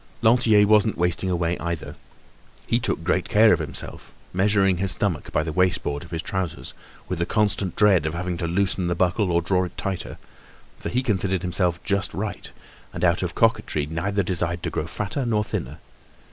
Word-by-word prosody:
Lantier 110 -3 +5
wasn't 105 0 +3
wasting 90 +2 +1
away 85 -1 0
either. 85 -1 -4 0.7
He - - +1
took - - -2
great - - 0
care - - +6
of - - +1
himself, - - -7 0.2
measuring 95 0 +3
his 95 +1 +1
stomach 90 -8 -2
by - - +1
the 80 - -3
waist 90 +2 +2
band 75 +2 -3
of 85 - -13
his 80 -1 -4
trousers, 95 -4 -4 0.3
with 90 -2 -3
the 85 - +1
constant 100 -4 0
dread 95 -7 +4
of 80 - -3
having 90 +1 -3
to 85 - -2
loosen 95 +1 0
the 85 - 0
buckle 90 +1 +1
or 85 0 +2
draw 90 +1 +1
it 90 - -7
tighter; 95 -2 -4 0.6
for - - -4
he 125 +3 0
considered 95 -5 0
himself 90 -1 0
just 100 -1 -1
right, 105 +2 -4 0.4
and - - -6
out - - +2
of - - -3
coquetry 75 -2 +1
neither 95 +6 -1
desired 85 -2 -2
to - - -2
grow 75 - -3
fatter 110 - -3
nor 110 -3 +1
thinner. - - -5
90 Hz, 190 wpm, -24 LUFS, 85-100 Hz, 0.7 s, care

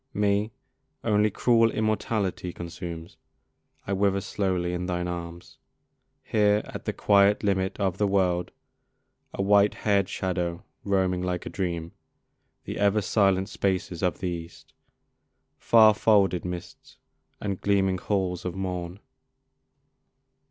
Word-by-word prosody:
Me 105 +1 +1 0.5
only 105 -1 +3
cruel 115 +2 +3
immortality 105 -5 -1
Consumes: 85 0 -8 0.7
I 100 - -2
wither 100 0 +2
slowly 90 -3 -1
in 90 0 -3
thine 90 -1 -2
arms, 85 0 -7 0.6
Here 105 -1 +2
at - - -8
the - - 0
quiet 100 +1 +3
limit 95 0 0
of 95 -2 -1
the 105 - +2
world, 90 -3 +1 0.8
A 95 - -3
white 100 +1 +4
hair'd 100 -3 +1
shadow 90 -1 -2 0.2
roaming 95 -2 +1
like 90 -1 -3
a - - -6
dream 85 -3 -3 0.7
The - - -5
ever 100 +1 +2
silent 95 -2 +2
spaces 95 -4 -2
of 90 -2 0
the 90 - -1
East, 85 -1 -8 0.9
Far 110 -2 +6
folded 100 -5 +2
mists, 90 -1 -8 0.4
and 100 -2 -4
gleaming 95 -2 +1
halls 95 -2 -1
of 90 -1 -4
morn. 90 -1 -4
95 Hz, 125 wpm, -26 LUFS, 90-100 Hz, 0.9 s, Far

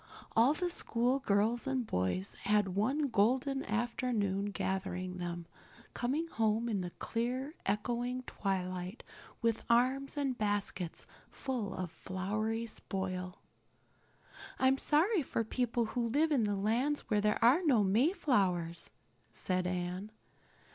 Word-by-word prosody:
All 245 +7 +5
the 355 +2 0
school 250 -3 +1
girls 225 +2 +1
and 260 -2 0
boys 90 - -1
had 210 -1 +3
one 260 +10 +1
golden 260 +6 +2
afternoon 220 -3 0
gathering 185 -2 -3
them, 175 -1 -4 0.5
coming 285 +7 -1
home 225 -4 +1
in 210 -5 0
the 175 - -3
clear, 250 - -3
echoing 240 +5 -1
twilight 185 -1 -3 0.4
with 230 -1 +1
arms 260 +4 +3
and 275 -3 0
baskets 205 -5 -1 0.2
full 250 -7 -3
of 180 -3 -4
flowery 215 +6 -2
spoil. 185 -4 -4 1.1
"I'm 265 +1 +3
so 295 - +3
sorry 395 0 +2
for 230 -4 -1
people 235 +1 0
who 240 -1 0
live 300 +7 +2
in 205 -8 +1
lands 255 +8 +1
where 210 -1 0
there 210 0 +2
are 270 +9 +6
no 255 -10 +4
Mayflowers," 195 - +2 0.4
said 185 -1 -1
Anne. 180 +3 -3
220 Hz, 125 wpm, -33 LUFS, 190-255 Hz, 1.1 s, are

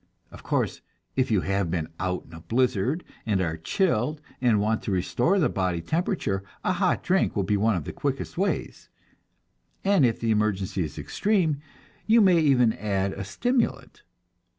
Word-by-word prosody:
Of - - -11
course, - - -1 0.3
if 130 -1 +1
you 105 -5 +2
have 95 -2 0
been 80 -2 -1
out 90 0 -2
in 80 - -17
a 80 - -8
blizzard, 125 - 0 0.2
and 105 -4 0
are 85 -3 -1
chilled, 150 - 0 0.2
and 120 -5 +3
want 110 +2 +1
to - - -3
restore 120 - +1
the 170 - +3
body 90 -3 -1
temperature, 155 - -1 0.2
a 185 - +1
hot 185 0 +1
drink 190 +1 +1
will 100 - +1
be 105 - +1
one 110 +1 +2
of 85 - -2
the - - -6
quickest - - -3
ways, - - -2 0.9
and 195 -5 +4
if 120 -3 +2
the 115 -1 0
emergency 100 -3 0
is 75 - -7
extreme, 175 -9 0 0.5
you 225 +2 +6
may 185 -5 +5
even 130 -7 +4
add 100 -2 -1
a - - -5
stimulant. 245 - -1
110 Hz, 175 wpm, -26 LUFS, 95-160 Hz, 0.9 s, you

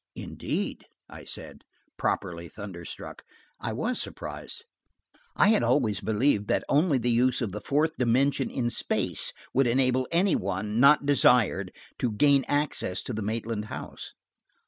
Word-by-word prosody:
"Indeed!" - - -4 0.3
I - - -10
said, - - -7 0.3
properly 85 0 -2
thunderstruck. 95 -3 -9 0.4
I - - -3
was 230 - -1
surprised. 460 - -6 0.7
I 200 - +5
had 220 - +4
always 120 -3 +1
believed 110 -1 +1
that - - +1
only 150 0 +3
the 120 0 0
use 125 +2 +2
of 115 -6 -2
the 105 +2 -6
fourth 150 +7 +1
dimension 130 +2 +2
in 120 -2 -1
space - - +1 0.2
would 135 0 +3
enable 130 +1 +2
any 175 +3 +3
one, 105 +4 -2
not 140 +2 +6
desired, 120 -8 +3 0.3
to 120 - 0
gain 140 +4 +3
access 145 -10 0
to 125 - -5
the 110 - -3
Maitland 110 0 -3
house. - - -8
125 Hz, 145 wpm, -27 LUFS, 105-140 Hz, 0.7 s, not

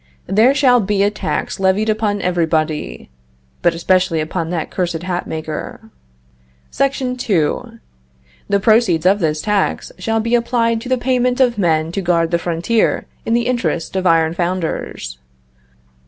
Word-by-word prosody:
There 220 +8 +3
shall 255 -4 +4
be 200 -1 +1
a 205 - +2
tax 210 - -3
levied 195 +3 +2
upon 215 -2 0
everybody 160 - -1 0.5
(but 170 -1 +2
especially 185 0 +1
upon 165 +1 -3
that 170 -3 -3
cursed 175 -3 -2
hat 180 -1 -3
maker). 160 +7 -6 0.8
SEC. 275 0 +1 0.3
2. 225 +2 -1 0.7
The 200 0 +3
proceeds 215 -6 +3
of 195 +2 +4
this 155 -3 -1
tax 210 -2 0
shall 225 +4 0
be 230 +2 -2
applied 235 -1 +1
to 245 - -7
the 255 - +2
payment 250 0 0
of 240 -4 +2
men 160 -3 +1
to 195 - -2
guard 170 -2 +1
the 170 - +2
frontier 175 +7 0 0.2
in 225 - +2
the 235 0 +1
interest 190 -10 -1
of 190 -1 +1
iron 165 -1 +3
founders. 170 - -3
190 Hz, 150 wpm, -18 LUFS, 165-230 Hz, 0.8 s, shall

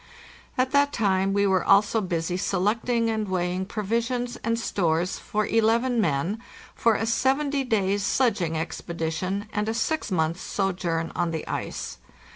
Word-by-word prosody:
At 255 0 +1
that 285 0 +4
time 195 -4 +1
we 200 0 +2
were 190 -2 +2
also 205 +3 +4
busy 175 -2 -2
selecting 215 +5 +1
and 215 -1 -1
weighing 180 0 -1
provis 225 +3 -1
ions 245 -1 -2
and 230 0 -1
stores 175 -5 0
for 215 0 -1
eleven 230 +2 +2
men 170 +6 0 0.3
for 230 -2 +3
a 225 - 0
seventy 270 +4 +1
days' 205 -5 +1
sledging 200 -10 +1
expedi 160 0 -3
tion 190 +5 -2
anda 210 +2 -1
six 315 +5 -1
months' 165 -2 0
sojourn 175 -4 -1
on 175 -1 0
the 160 -1 -4
ice. - - -4
200 Hz, 150 wpm, -25 LUFS, 180-230 Hz, 0.3 s, that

